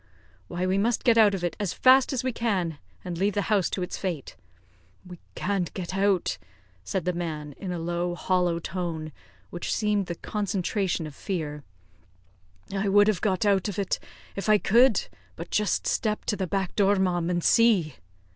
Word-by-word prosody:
"Why, 175 Hz, +1 st, -2 dB
we 190 Hz, +1 st, +1 dB
must 230 Hz, +3 st, +1 dB
get 235 Hz, -3 st, +5 dB
out 205 Hz, -2 st, +6 dB
of 180 Hz, -, -5 dB
it 175 Hz, -2 st, -1 dB
as 200 Hz, -4 st, -1 dB
fast 260 Hz, +1 st, +5 dB
as 255 Hz, -3 st, -1 dB
we 255 Hz, -, 0 dB
can, 185 Hz, -10 st, -1 dB, 0.3 s
and 170 Hz, -2 st, -4 dB
leave 200 Hz, +1 st, +1 dB
the 205 Hz, -, +1 dB
house 195 Hz, -5 st, +2 dB
to 185 Hz, -, -2 dB
its 180 Hz, -, -5 dB
fate." 175 Hz, -8 st, -4 dB, 0.7 s
"We 180 Hz, -1 st, -11 dB, 0.2 s
can't 195 Hz, -4 st, -1 dB
get 185 Hz, 0 st, -4 dB
out," 195 Hz, -, +1 dB, 0.4 s
said 180 Hz, -, -3 dB
the 180 Hz, -, 0 dB
man, 155 Hz, -4 st, -4 dB
in 185 Hz, -, -5 dB
a 175 Hz, -, -3 dB
low, 175 Hz, +1 st, -2 dB
hollow 180 Hz, -1 st, +1 dB
tone, 170 Hz, -3 st, -4 dB, 0.4 s
which 175 Hz, -, -4 dB
seemed 210 Hz, -3 st, 0 dB
the 170 Hz, -, -4 dB
concentration 195 Hz, -3 st, -2 dB
of 150 Hz, -, -8 dB
fear; 150 Hz, -4 st, -4 dB, 1.1 s
"I 200 Hz, 0 st, 0 dB
would 205 Hz, +1 st, +5 dB
have 205 Hz, -5 st, 0 dB
got 195 Hz, -1 st, +1 dB
out 200 Hz, -1 st, +3 dB
of 195 Hz, -, -6 dB
it 200 Hz, -2 st, -1 dB, 0.4 s
if 200 Hz, +2 st, -3 dB
I 215 Hz, -, +7 dB
could; 235 Hz, +2 st, +4 dB, 0.3 s
but 170 Hz, -, -8 dB
just 210 Hz, -3 st, +1 dB
step 215 Hz, -2 st, -1 dB
to -, -, 0 dB
the 190 Hz, -2 st, -2 dB
back 190 Hz, 0 st, -2 dB
door, 200 Hz, 0 st, +4 dB
ma'am, 180 Hz, -3 st, 0 dB
and 175 Hz, -1 st, -1 dB
see." 205 Hz, -, +3 dB
190 Hz, 185 wpm, -26 LUFS, 175-205 Hz, 1.1 s, I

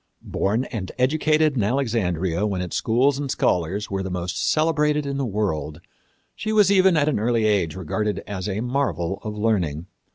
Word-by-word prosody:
Born 110 Hz, +6 st, 0 dB
and 100 Hz, -6 st, -4 dB
educated 155 Hz, +3 st, +2 dB
in 120 Hz, -, +1 dB
Alexandria 100 Hz, -, 0 dB
when 100 Hz, -3 st, -2 dB
its 90 Hz, -1 st, -4 dB
schools 130 Hz, +5 st, +2 dB
and 140 Hz, -1 st, -3 dB
scholars 95 Hz, 0 st, 0 dB
were 95 Hz, 0 st, -1 dB
the 95 Hz, -, -4 dB
most 90 Hz, -2 st, -2 dB
celebrated 150 Hz, -2 st, +1 dB
in 140 Hz, -1 st, -3 dB
the 135 Hz, -2 st, -1 dB
world, 80 Hz, -8 st, -2 dB, 0.5 s
she 215 Hz, -, -4 dB
was 210 Hz, -3 st, +4 dB
even 190 Hz, -3 st, +5 dB
at 145 Hz, -1 st, +2 dB
an 145 Hz, -8 st, +1 dB
early 115 Hz, 0 st, +1 dB
age 100 Hz, -7 st, +1 dB
regarded 105 Hz, +4 st, -2 dB
as 100 Hz, -1 st, -4 dB
a 100 Hz, +2 st, -2 dB
marvel 100 Hz, -, -1 dB
of 105 Hz, -1 st, -5 dB
learning. 90 Hz, -8 st, 0 dB
110 Hz, 175 wpm, -23 LUFS, 95-140 Hz, 0.5 s, even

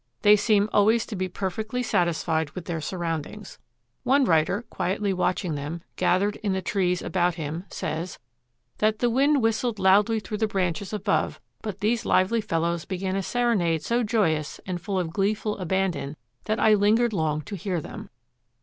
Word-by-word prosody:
They 210 Hz, 0 st, +8 dB
seem 210 Hz, -1 st, +3 dB
always 220 Hz, +3 st, +4 dB
to 220 Hz, -, -6 dB
be 185 Hz, 0 st, -1 dB
perfectly 215 Hz, +7 st, -3 dB
satisfied 165 Hz, -5 st, 0 dB
with 180 Hz, -3 st, -6 dB
their 165 Hz, -3 st, -3 dB
surroundings. 170 Hz, +4 st, -4 dB, 0.4 s
One 270 Hz, +1 st, +3 dB
writer, 165 Hz, +5 st, +2 dB
quietly 195 Hz, 0 st, -1 dB
watching 180 Hz, -2 st, 0 dB
them, 150 Hz, +4 st, -5 dB
gathered 200 Hz, +3 st, +1 dB
in 205 Hz, -3 st, -1 dB
the 190 Hz, -, -1 dB
trees 180 Hz, -1 st, 0 dB
about 175 Hz, -2 st, +1 dB
him, 160 Hz, +2 st, -5 dB
says 165 Hz, +2 st, -4 dB, 0.6 s
that 215 Hz, 0 st, +2 dB
"The 240 Hz, +1 st, +1 dB
wind 275 Hz, +2 st, +3 dB
whistled 225 Hz, 0 st, +1 dB
loudly 200 Hz, +4 st, +4 dB
through 210 Hz, +1 st, -5 dB
the 220 Hz, -, +2 dB
branches 190 Hz, -1 st, -2 dB
above, 205 Hz, -1 st, 0 dB, 0.2 s
but 210 Hz, -3 st, -6 dB
these 225 Hz, +2 st, +1 dB
lively 220 Hz, +5 st, +2 dB
fellows 170 Hz, -2 st, -1 dB
began 190 Hz, 0 st, -3 dB
a 195 Hz, -, 0 dB
serenade 190 Hz, -8 st, +1 dB
so 235 Hz, +6 st, +1 dB
joyous 170 Hz, -10 st, 0 dB
and 180 Hz, -2 st, -4 dB
full 195 Hz, +1 st, -2 dB
of 170 Hz, -3 st, -2 dB
gleeful 210 Hz, +2 st, 0 dB
abandon 175 Hz, -6 st, -1 dB, 0.3 s
that 215 Hz, +1 st, 0 dB
I 220 Hz, -, +5 dB
lingered 215 Hz, +3 st, +3 dB
long 155 Hz, -4 st, 0 dB
to 200 Hz, -, -7 dB
hear 185 Hz, -1 st, -2 dB
them. -, -, -8 dB
195 Hz, 170 wpm, -25 LUFS, 170-215 Hz, 0.6 s, They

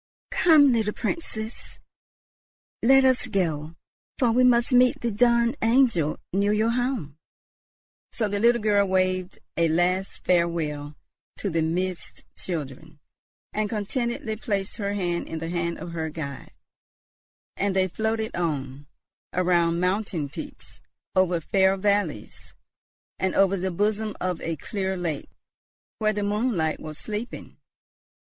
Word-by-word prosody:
"Come, 305 Hz, -5 st, +6 dB
little 220 Hz, -2 st, +1 dB
Princess, 225 Hz, -5 st, -5 dB, 1.0 s
let 270 Hz, +2 st, +6 dB
us 255 Hz, -1 st, +2 dB
go; 165 Hz, -7 st, -1 dB, 0.4 s
for 245 Hz, -3 st, +3 dB
we 250 Hz, +2 st, +4 dB
must 245 Hz, +1 st, +4 dB
meet 250 Hz, 0 st, +5 dB
the 235 Hz, -, -1 dB
dawn 235 Hz, +3 st, +3 dB
angel 225 Hz, -, +3 dB, 0.2 s
near 200 Hz, +2 st, +2 dB
your 220 Hz, +2 st, +2 dB
home." 240 Hz, -, -2 dB, 0.9 s
So 220 Hz, -, -1 dB
the 205 Hz, 0 st, -2 dB
little 235 Hz, 0 st, +3 dB
girl 205 Hz, -2 st, +3 dB
waved 185 Hz, 0 st, 0 dB, 0.2 s
a 170 Hz, 0 st, +3 dB
last 180 Hz, +4 st, 0 dB
farewell 160 Hz, -4 st, 0 dB, 0.4 s
to 200 Hz, -, -3 dB
the 165 Hz, 0 st, +1 dB
Mist 180 Hz, +3 st, -3 dB
children, 155 Hz, -2 st, -5 dB, 0.5 s
and 215 Hz, 0 st, -1 dB
contentedly 235 Hz, +2 st, -2 dB
placed 200 Hz, -4 st, -2 dB
her 200 Hz, -2 st, -2 dB
hand 175 Hz, -3 st, -1 dB
in 160 Hz, -, -5 dB
the 165 Hz, +1 st, -4 dB
hand 170 Hz, -1 st, -2 dB
of 175 Hz, -, -7 dB
her 160 Hz, -1 st, -3 dB
guide; 140 Hz, -4 st, -7 dB, 1.0 s
and 200 Hz, -1 st, 0 dB
they 190 Hz, 0 st, +3 dB
floated 220 Hz, +3 st, -2 dB
on, 145 Hz, -4 st, -3 dB, 0.5 s
around 175 Hz, -2 st, +2 dB
mountain 180 Hz, -5 st, -1 dB
peaks, -, -, -9 dB, 0.3 s
over 180 Hz, -2 st, +3 dB
fair 190 Hz, +3 st, +2 dB
valleys, 200 Hz, -, -1 dB, 0.6 s
and 190 Hz, 0 st, 0 dB
over 195 Hz, 0 st, +4 dB
the 190 Hz, 0 st, -2 dB
bosom 210 Hz, +3 st, -1 dB
of 180 Hz, -2 st, -2 dB
a 165 Hz, -, -2 dB
clear 190 Hz, +2 st, -3 dB
lake, 165 Hz, -5 st, -3 dB, 0.7 s
where 215 Hz, -1 st, +2 dB
the 205 Hz, -1 st, -2 dB
moonlight 205 Hz, -6 st, 0 dB
was 155 Hz, -1 st, -8 dB
sleeping. 215 Hz, +3 st, -6 dB
190 Hz, 130 wpm, -25 LUFS, 170-220 Hz, 1.0 s, Come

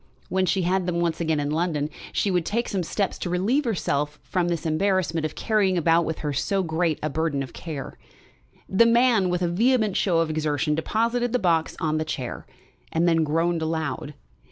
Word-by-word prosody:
When 190 Hz, 0 st, +1 dB
she 185 Hz, +2 st, +1 dB
had 185 Hz, +1 st, +1 dB
them 170 Hz, -1 st, 0 dB
once 170 Hz, -1 st, 0 dB
again 160 Hz, -2 st, +1 dB
in 145 Hz, 0 st, -1 dB
London 155 Hz, -2 st, 0 dB, 0.2 s
she 200 Hz, -, 0 dB
would 180 Hz, -2 st, +1 dB
take 235 Hz, +7 st, -1 dB
some 195 Hz, -3 st, -1 dB
steps 195 Hz, +3 st, -2 dB
to 180 Hz, -, -3 dB
relieve 215 Hz, +12 st, +1 dB
herself 150 Hz, -9 st, -1 dB
from 180 Hz, -2 st, -1 dB
this 170 Hz, -2 st, -2 dB
embarrassment 165 Hz, -1 st, +1 dB
of 155 Hz, -, -13 dB
carrying 200 Hz, -4 st, +1 dB
about 165 Hz, 0 st, +3 dB
with 160 Hz, 0 st, -3 dB
her 145 Hz, -, -1 dB
so 190 Hz, +8 st, 0 dB
great 160 Hz, -1 st, 0 dB
a 155 Hz, -, 0 dB
burthen 155 Hz, -2 st, -1 dB
of 130 Hz, -, -10 dB
care. 150 Hz, -5 st, -7 dB, 0.7 s
The 230 Hz, +5 st, +4 dB
man, 230 Hz, -5 st, +4 dB
with 180 Hz, 0 st, 0 dB
a -, -, +2 dB
vehement 220 Hz, +3 st, +2 dB
show 180 Hz, -4 st, +2 dB
of 165 Hz, -1 st, +1 dB
exertion, 150 Hz, -1 st, 0 dB
deposited 230 Hz, +9 st, 0 dB
the -, -, +4 dB
box 170 Hz, -6 st, +1 dB
on 155 Hz, -2 st, 0 dB
a -, -, +1 dB
chair, 130 Hz, -5 st, -5 dB, 0.4 s
and 165 Hz, +2 st, +2 dB
then 165 Hz, -1 st, +3 dB
groaned 165 Hz, +2 st, 0 dB
aloud. 160 Hz, -2 st, -3 dB
170 Hz, 200 wpm, -25 LUFS, 155-190 Hz, 0.7 s, The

